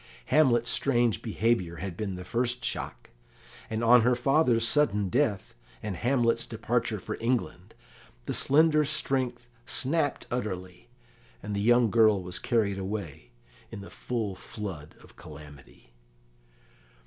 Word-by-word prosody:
Hamlet's 120 -6 +3
strange 120 -5 +1
behaviour 110 -6 -1
had 95 0 -6
been 100 -1 -4
the 90 0 -8
first 120 +3 -1
shock, - - -4 0.6
and 110 +1 -3
on 120 +1 +6
her 125 +2 +3
father's 125 -3 +2
sudden 105 -10 +1
death, 115 -4 -1 0.3
and 105 -3 -4
Hamlet's 120 +2 +1
departure - - -2
for - - -6
England, 120 +1 -3 0.5
the - - -3
slender 155 +2 +5
strength 130 -4 0 0.2
snapped 145 +1 0
utterly, 95 -4 -5 0.5
and 105 - -4
the 100 - -1
young 120 0 +3
girl 110 -2 +4
was 90 0 -4
carried 105 -5 0
away 95 - -6 0.4
in - - -8
the 100 - -11
full 115 -5 -4
flood 95 -6 -8
of - - -18
calamity. 70 -4 -14
115 Hz, 130 wpm, -27 LUFS, 95-125 Hz, 0.6 s, on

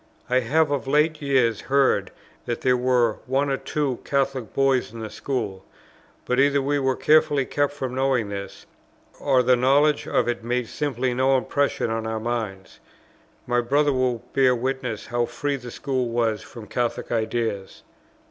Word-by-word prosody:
I 130 - +4
have 145 +5 +1
of 135 -4 -2
late 150 +2 +2
years 130 -6 +2
heard 135 -8 +2 0.4
that 120 - -3
there 125 -1 +3
were 125 -3 +2
one 135 +2 +1
or 135 - +1
two 140 -4 -2
Catholic 135 -5 -1
boys 135 -3 +1
in 115 - -9
the 110 - -6
school; 105 -9 -4 0.6
but 125 +1 0
either 140 +1 +4
we 140 +1 0
were 135 -1 +1
carefully 150 -2 +3
kept 145 +1 0
from 130 -3 -4
knowing 130 -5 +1
this, 100 -1 -7 0.5
or 130 -3 +3
the 125 +1 +4
knowledge 140 +4 +3
of - - +1
it 120 -1 -2
made 120 0 -1
simply 130 -3 -2
no 130 +2 +3
impression 140 -3 0
on 115 0 -2
our 110 0 -2
minds. 110 -4 -4 0.7
My 120 0 +1
brother 145 +4 +2
will 125 -3 0
bear 130 -2 +4
witness 125 -3 -3
how 120 0 0
free 145 -1 -2
the 125 -2 -9
school 130 -1 -2
was 115 -2 0
from 115 -4 -11
Catholic 120 +1 -2
ideas. 110 -3 -2
130 Hz, 165 wpm, -24 LUFS, 115-140 Hz, 0.7 s, I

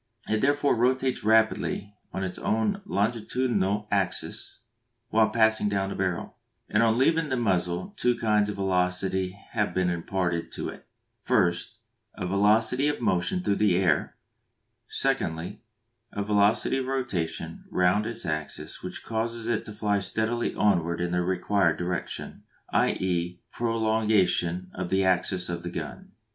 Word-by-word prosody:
It 110 0 +1
therefore 145 0 +3
rotates 130 +2 +1
rapidly 110 -2 +2
upon 95 - -5
its 95 -1 -4
own 110 - 0
longitudinal 105 - 0
axis 100 +1 -2 0.5
while 110 -1 +4
passing 110 -1 +3
down 100 -1 0
the - - -4
barrel, 95 -3 -2 0.3
and 105 - +2
on 115 0 +3
leaving 160 +4 +3
the 130 - 0
muzzle 95 - 0
two 125 -9 +1
kinds 105 -2 +2
of 105 - -3
velocity 95 0 0
have 105 -3 -1
been 90 -1 +2
imparted 85 0 -2
to - - -4
it; - - -11 0.3
first, 85 0 +1 0.4
a - - -4
velocity 110 +8 +3
of 150 - -1
motion 120 - 0
through 100 - +1
the 100 -4 +3
air; 90 -6 +1 0.7
secondly, 80 +4 -1 0.5
a 100 - -2
velocity 105 +5 +2
of 130 - -3
rotation 120 -11 -3
round 90 +4 +2
its 115 -3 -6
axis 75 -3 -4
which - - -7
causes 115 0 -2
it 120 -2 0
to - - -7
fly 105 -1 0
steadily 110 +4 -1
onward 85 -5 +2
in 90 0 -1
the 90 0 +1
required 95 -1 +1
direction, 90 -1 -4 0.3
i.e. 90 -1 0
a - - -40
prolongation 110 -6 +1
of 90 -1 -4
the 95 0 +2
axis 90 0 +1
of 85 -1 -3
the 85 - -5
gun. - - -7
100 Hz, 145 wpm, -27 LUFS, 90-115 Hz, 0.7 s, while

